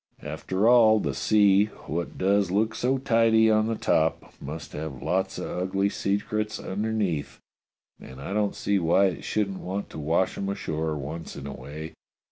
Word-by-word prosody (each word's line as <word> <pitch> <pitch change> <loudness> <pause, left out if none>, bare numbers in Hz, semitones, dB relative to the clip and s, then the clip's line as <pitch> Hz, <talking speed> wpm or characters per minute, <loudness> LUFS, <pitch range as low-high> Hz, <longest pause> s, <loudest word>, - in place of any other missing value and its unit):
After 95 +7 -1
all, 115 -3 +6
the 75 -8 -2
sea, 100 +7 +4 0.2
what 85 +3 -4
does 100 0 +2
look 110 +4 +1
so 130 +2 0
tidy 115 -3 +4
on 110 0 +3
the 115 - -1
top, 80 -6 0
must 75 +1 -7
have 75 -4 -6
lots 90 +5 -1
of - - -4
ugly 95 +2 0
secrets 105 +2 -2
underneath, 100 -6 -2 0.6
and 65 +1 -11
I 70 +8 -5
don't 105 -1 0
see 100 -1 0
why 90 +3 +4
it 90 - -7
shouldn't 100 -3 -1
want 95 +2 -5
to - - -7
wash 80 +5 0
'em 100 - -2
ashore 80 -5 -2
once 75 +4 -6
in 70 - -8
a 70 - -5
way. 75 +5 -8
95 Hz, 170 wpm, -26 LUFS, 80-105 Hz, 0.6 s, all